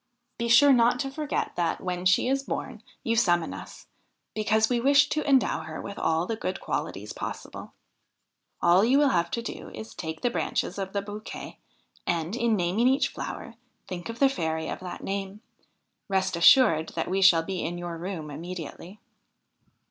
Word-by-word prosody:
Be 235 - -1
sure 275 +4 +7
not 240 0 +4
to 270 - -3
forget 300 +1 -2
that, 170 -1 0
when 180 -1 -4
she 190 +6 +3
is 270 +1 +1
born, 250 -4 -5 0.2
you 230 - 0
summon 175 -7 +2
us, - - -10 0.5
because 220 +1 +2
we 245 0 +1
wish 280 +3 +5
to 305 - -1
endow 265 -2 +3
her 160 0 -7
with 200 - -7
all 160 +1 +1
the 225 - -2
good 185 -3 -4
qualities - - -4
possible. - - -7 0.9
All 175 +3 +5
you 250 +5 +4
will 290 -1 +4
have 170 -4 +1
to 235 - -3
do - - -7
is 220 - -8
to - - -17
take 160 -2 -5
the 245 - +1
branches 205 - -2
of 190 -1 -4
the 200 -1 -1
bouquet, 210 +1 -8 0.5
and, 170 +3 -1
in 235 -2 +2
naming 190 +6 +1
each 265 +2 +3
flower, - - -7 0.3
think 180 +2 -6
of 230 - -5
the 275 - +5
fairy 160 -10 -2
of - - -4
that 180 -1 -7
name; 195 +1 -4 0.7
rest 190 -1 +1
assured 170 -2 +6
that 165 - -1
we 190 +1 0
shall 175 -4 +6
be 185 +1 -3
in 175 +1 -3
your 175 -1 -5
room 165 -3 -5
immediately.' 175 +4 -8
195 Hz, 185 wpm, -27 LUFS, 175-235 Hz, 0.9 s, sure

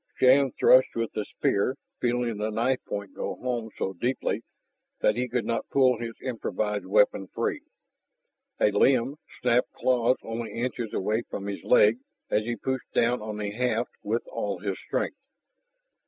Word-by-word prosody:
Shann 130 +1 +5
thrust 130 0 +6
with 115 -1 -1
the 105 - -2
spear, 100 +7 0 0.2
feeling 120 -2 0
the 105 +1 -1
knife 120 +4 0
point 100 -2 -5
go - - -4
home 120 -3 -3
so 95 - -2
deeply 120 +8 -1 0.6
that - - +3
he 125 +1 -1
could 120 0 -1
not 115 - -2
pull 130 -2 +4
his 115 -1 -5
improvised 105 -5 -2
weapon 100 -1 +3
free. - - -2 1.0
A 105 - +4
limb 130 +6 +3 0.3
snapped 125 0 +3
claws 125 0 +2
only 115 -1 -5
inches 120 -1 -3
away 110 +4 0
from 100 - -5
his 100 -1 -5
leg 115 -1 +5 0.3
as 110 - +2
he 120 0 -1
pushed 130 0 -3
down 120 0 +3
on 105 -1 -5
the 105 -1 -3
haft 125 +4 0
with - - -1
all - - -3
his - - -3
strength. - - -3
115 Hz, 160 wpm, -27 LUFS, 105-125 Hz, 1.0 s, thrust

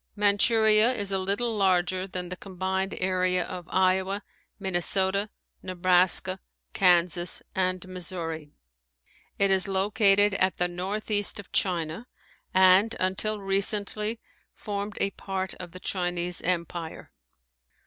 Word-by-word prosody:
Manchuria 215 +2 +4
is 205 -5 -2
a 195 - 0
little 205 +5 -1
larger 185 -1 +1
than 180 -1 -6
the 180 - -4
combined 190 0 -3
area 185 -1 +1
of 180 -3 -8
Iowa, 190 +2 +1 0.4
Minnesota, 190 +2 +1 0.3
Nebraska, 185 +1 +3 0.3
Kansas, 175 -1 +2
and 185 -1 -1
Missouri. 165 -4 -5 0.9
It 200 -1 +2
is 190 +1 +3
located 200 +1 +3
at 190 -1 +1
the 180 - +1
northeast 205 +4 -1
of 200 - -11
China 175 +3 -1 0.4
and 190 +4 +5
until 200 +3 -1
recently 205 +3 -1 0.4
formed 205 0 -5
a 200 - +1
part 190 -1 -4
of 175 - -8
the 185 - -10
Chinese 175 -1 -2
Empire. 170 -2 -4
190 Hz, 115 wpm, -26 LUFS, 180-200 Hz, 0.9 s, and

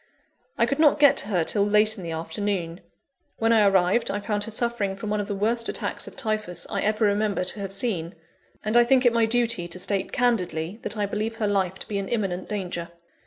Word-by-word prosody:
I - - +4
could 275 +5 -2
not 305 -2 +5
get 285 -1 +6
to - - +2
her 180 -6 +1
till 200 +5 +1
late 210 +1 +3
in 200 - -9
the 170 - -5
afternoon. 165 +1 -3 0.6
When 225 +1 +2
I 215 -2 +5
arrived, 195 +3 +2
I 205 - -2
found 205 0 -2
her - - -7
suffering 220 -3 -1
from 205 +2 -5
one 210 - 0
of 205 - -3
the 205 - -3
worst 230 +4 +1
attacks - - -3
of - - -11
Typhus 215 -8 -2
I 200 -2 -1
ever 215 +1 +1
remember 205 -1 +1
to 185 +3 -2
have 195 -1 -5
seen; 195 -5 -1 0.5
and 215 +2 -1
I 240 - +7
think 255 +1 +3
it 240 - +5
my 230 -1 +3
duty 230 -6 +1
to 175 - -5
state 195 +1 -1
candidly, 190 -6 -1
that 215 - -5
I 205 - 0
believe 215 +3 -3
her 225 - -2
life 190 -3 0
to - - -9
be 200 -2 -2
in 195 - -4
imminent 195 -6 -2
danger. 180 -5 -4
205 Hz, 230 wpm, -25 LUFS, 190-225 Hz, 0.6 s, I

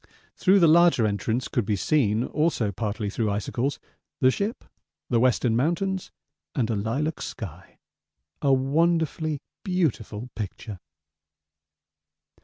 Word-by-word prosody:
Through 190 +1 +4
the 170 - +7
larger 170 -7 +5
entrance 110 +4 -1
could 120 - 0
be 105 +1 0
seen, 110 -1 +2
also 150 -8 0
partly 105 +1 -3
through 110 +2 -1
icicles, 120 +7 -1 0.4
the 130 -1 +5
ship, 205 - -3 0.5
the 120 - +4
Western 120 -1 +2
Mountains, 175 - 0 0.5
and 120 -5 0
a - - 0
lilac 135 +10 -2
sky; 95 -4 -8 0.6
a 140 - +3
wonderfully 155 +2 +1 0.2
beautiful 125 - -1
picture. 105 -1 -6
125 Hz, 115 wpm, -25 LUFS, 110-160 Hz, 0.6 s, the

